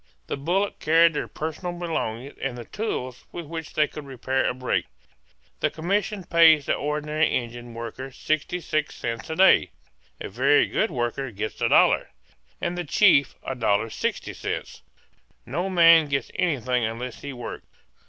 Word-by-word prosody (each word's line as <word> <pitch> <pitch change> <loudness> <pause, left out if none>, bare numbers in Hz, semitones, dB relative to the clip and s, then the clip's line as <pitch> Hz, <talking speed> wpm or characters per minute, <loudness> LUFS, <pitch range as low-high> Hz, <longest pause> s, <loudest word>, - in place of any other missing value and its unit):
The - - -3
bullock 180 +8 -1
carried 165 +2 +5
their - - -3
personal 160 +3 -5
belongings 140 -7 -3
and 130 -3 -3
the 120 - -8
tools 130 - -4
with 170 - -6
which 160 0 -7
they 150 -1 +3
could 150 - -9
repair 135 0 -1
a - - -1
break. 130 0 -1 0.7
The - - +1
commission 195 +4 -1
pays 160 -4 +5
the - - +1
ordinary 150 +1 0
Indian 120 -1 -4
worker 115 +3 -6
66 155 +2 -2
cents 115 +3 -5
a 160 - -2
day; 190 +3 +5 0.5
a - - -5
very 440 +1 +3
good 220 - 0
worker 130 -1 -2
gets 110 0 -5
$1, - - +4 0.5
and 175 0 -2
the 175 - -3
chief 155 -3 +4
$1.66. 115 -3 -2 0.6
No 170 +10 -2
man 165 -3 +6
gets 140 -3 -2
anything 130 -9 0
unless 115 +2 -4
he 140 - -6
works. 120 -2 -8
150 Hz, 145 wpm, -25 LUFS, 125-170 Hz, 0.7 s, man